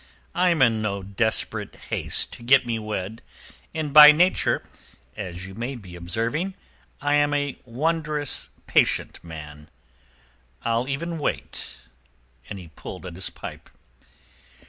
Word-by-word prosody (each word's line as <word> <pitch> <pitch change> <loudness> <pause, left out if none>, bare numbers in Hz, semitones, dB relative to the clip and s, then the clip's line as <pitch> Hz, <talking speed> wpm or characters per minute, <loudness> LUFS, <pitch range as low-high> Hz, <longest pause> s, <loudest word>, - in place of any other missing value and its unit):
I 180 +1 +3
am 165 -6 +4
in 115 -3 +3
no 100 -2 -2
desperate 110 +3 -1 0.2
haste - - -1
to - - -8
get 130 +2 +5
me 115 -2 -1
wed, 105 0 -4 0.5
and 155 -3 -3
by 150 0 +12
nature—as 105 - -1
you 95 - -9
may 120 +6 -4
be 95 -7 -10
observing—I 145 - -3
am 145 0 +3
a 145 -1 -1
wondrous 150 +3 -1 0.2
patient - - +2
man. 75 -2 -10 1.0
I'll 115 +2 +1
even 165 +4 -2
wait," 145 - -3 0.7
And 100 - -5
he 90 -3 -10
pulled 90 +3 -9
at 90 - -6
his 95 +2 -3
pipe. - - -9
115 Hz, 125 wpm, -25 LUFS, 95-145 Hz, 1.0 s, by